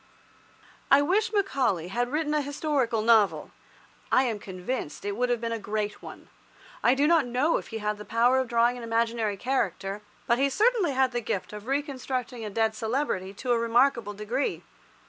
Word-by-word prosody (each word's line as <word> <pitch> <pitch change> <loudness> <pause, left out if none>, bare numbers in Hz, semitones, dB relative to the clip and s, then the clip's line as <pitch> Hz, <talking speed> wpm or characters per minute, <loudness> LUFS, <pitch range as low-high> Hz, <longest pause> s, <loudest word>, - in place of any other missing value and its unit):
I 280 +1 +6
wish 410 +8 +1
Macaulay 260 - 0
had 245 +5 -1
written 300 0 0
a 300 - +2
historical 280 -6 -1
novel. 220 -3 +3 0.6
I 260 - +5
am 230 -5 -2
convinced 190 - -5
that 205 - -2
it - - -1
would 250 +2 0
have 240 -1 +1
been 230 0 -3
a 230 - -2
great 210 0 -3
one. - - -11 0.5
I 245 - +4
do 280 +2 +2
not 320 -4 +4
know 255 +7 +1
if - - -7
he 225 - -5
had 210 -1 -2
the - - -7
power 240 +4 +3
of 260 - -1
drawing 235 +1 +2
an 240 - -8
imaginary 230 -2 0
character, 200 -5 -2 0.2
but 235 +1 +2
he 275 +1 +3
certainly 420 - +2
had 260 -1 +2
the 240 -1 -2
gift 205 -2 -3
of 210 +2 -9
reconstructing 260 -3 -3
a 215 - -4
dead 220 +1 +1
celebrity 220 -4 -2
to 250 +4 -3
a 235 - +3
remarkable 235 -2 +2
degree. 220 +7 -2
240 Hz, 190 wpm, -27 LUFS, 215-270 Hz, 0.6 s, I